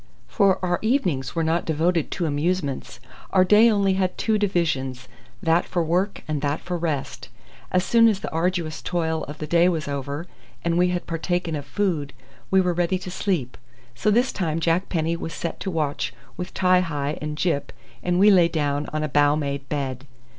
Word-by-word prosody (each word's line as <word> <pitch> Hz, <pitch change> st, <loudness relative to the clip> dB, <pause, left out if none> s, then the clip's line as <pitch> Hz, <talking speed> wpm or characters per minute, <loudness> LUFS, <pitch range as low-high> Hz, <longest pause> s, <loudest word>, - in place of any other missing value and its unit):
For 195 Hz, -3 st, +3 dB
our 175 Hz, -1 st, 0 dB
evenings 180 Hz, -, 0 dB
were 165 Hz, -, +1 dB
not 165 Hz, +2 st, +1 dB
devoted 165 Hz, +1 st, +1 dB
to 175 Hz, -, -2 dB
amusements. 150 Hz, -1 st, -2 dB, 0.3 s
Our 185 Hz, -1 st, +4 dB
day 210 Hz, +5 st, +6 dB
only 200 Hz, -3 st, +2 dB
had 190 Hz, -1 st, 0 dB
two 220 Hz, -1 st, +1 dB
divisions, 135 Hz, -10 st, -1 dB, 0.4 s
that 165 Hz, +1 st, +3 dB
for 175 Hz, -, -1 dB
work 180 Hz, +5 st, 0 dB
and 150 Hz, -2 st, -2 dB
that 145 Hz, +1 st, 0 dB
for 180 Hz, -, -4 dB
rest. 160 Hz, -5 st, -3 dB, 0.4 s
As 180 Hz, 0 st, +2 dB
soon 230 Hz, -1 st, +5 dB
as 210 Hz, -4 st, +2 dB
the -, -, -5 dB
arduous 165 Hz, -1 st, -1 dB
toil 160 Hz, -2 st, -1 dB
of 145 Hz, +2 st, -8 dB
the 155 Hz, -, -4 dB
day 170 Hz, +3 st, +4 dB
was 160 Hz, -4 st, -2 dB
over, 140 Hz, +3 st, -4 dB, 0.4 s
and 170 Hz, 0 st, +1 dB
we 180 Hz, +1 st, +4 dB
had 180 Hz, 0 st, -2 dB
partaken 170 Hz, 0 st, -2 dB
of 145 Hz, -1 st, -6 dB
food, 160 Hz, -7 st, -1 dB, 0.4 s
we 190 Hz, -, +4 dB
were 180 Hz, -1 st, +2 dB
ready 175 Hz, +2 st, +1 dB
for 180 Hz, 0 st, -8 dB
sleep; 175 Hz, -10 st, -2 dB, 0.3 s
so 125 Hz, -, 0 dB
this 240 Hz, +5 st, +3 dB
time 165 Hz, -4 st, -1 dB
Jack 165 Hz, +3 st, +1 dB
Penny 165 Hz, -1 st, 0 dB
was 165 Hz, -1 st, -6 dB
set 170 Hz, -, -4 dB
to 195 Hz, -, -3 dB
watch 155 Hz, -5 st, -2 dB, 0.2 s
with 180 Hz, 0 st, -5 dB
Ti 185 Hz, -1 st, +4 dB
hi 150 Hz, -4 st, -2 dB
and 150 Hz, 0 st, -4 dB
Gyp, 155 Hz, -4 st, 0 dB, 0.3 s
and 180 Hz, 0 st, 0 dB
we 205 Hz, +3 st, +7 dB
lay 180 Hz, -4 st, +6 dB
down 145 Hz, -3 st, -1 dB
on 155 Hz, 0 st, -2 dB
a -, -, 0 dB
bough 145 Hz, 0 st, +3 dB
made 140 Hz, -2 st, -3 dB
bed. 135 Hz, -2 st, -3 dB
170 Hz, 195 wpm, -24 LUFS, 150-185 Hz, 0.4 s, we